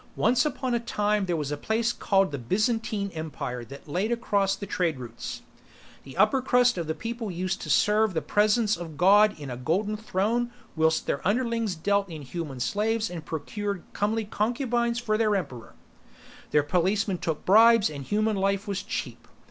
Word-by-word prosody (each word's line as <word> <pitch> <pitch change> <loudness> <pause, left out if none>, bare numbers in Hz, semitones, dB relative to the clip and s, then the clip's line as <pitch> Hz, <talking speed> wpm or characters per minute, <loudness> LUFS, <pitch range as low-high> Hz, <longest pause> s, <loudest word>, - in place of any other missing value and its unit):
Once 245 +5 +3
upon 260 -4 -2
a 235 - +2
time 210 -3 0
there 175 - 0
was 150 -3 -3
a - - 0
place 225 +7 0
called 195 -5 +2
the 140 - -4
Byzantine 210 - -1
Empire 140 -6 -5
that 140 +6 -12
laid 185 +9 -1
across 205 -5 +1
the 200 - -7
trade 175 -6 -1
routes. 120 -2 -7 0.6
The 135 +4 -11
upper 215 +7 +4
crust 250 -1 +3
of 160 -1 -3
people 230 +2 -4
used 185 +1 -3
to - - -6
serve 210 -2 +3
the 160 - +1
Presence 210 +1 +2
of 165 -3 -8
God 205 +2 +5
in 140 -3 -6
a 120 - -5
golden 190 - 0
throne 220 +3 -1 0.2
whilst 160 0 +2
their 140 - -1
underlings 230 -2 0
dealt 200 +4 0
in 155 -3 -7
human 140 -1 -6
slaves 215 - 0
and 170 -3 -6
procured 200 +5 -4
comely 215 +2 0
concubines 235 +2 0
for 215 -3 0
the 225 - +3
emperor; 185 - -2 0.7
their 150 - +3
policemen 185 +4 0
took 160 -4 -3
bribes 225 +2 +6
and 145 -2 -6
human 215 +7 0
life 195 +2 0
was 200 -1 -2
cheap. - - -5
200 Hz, 175 wpm, -26 LUFS, 165-220 Hz, 0.7 s, bribes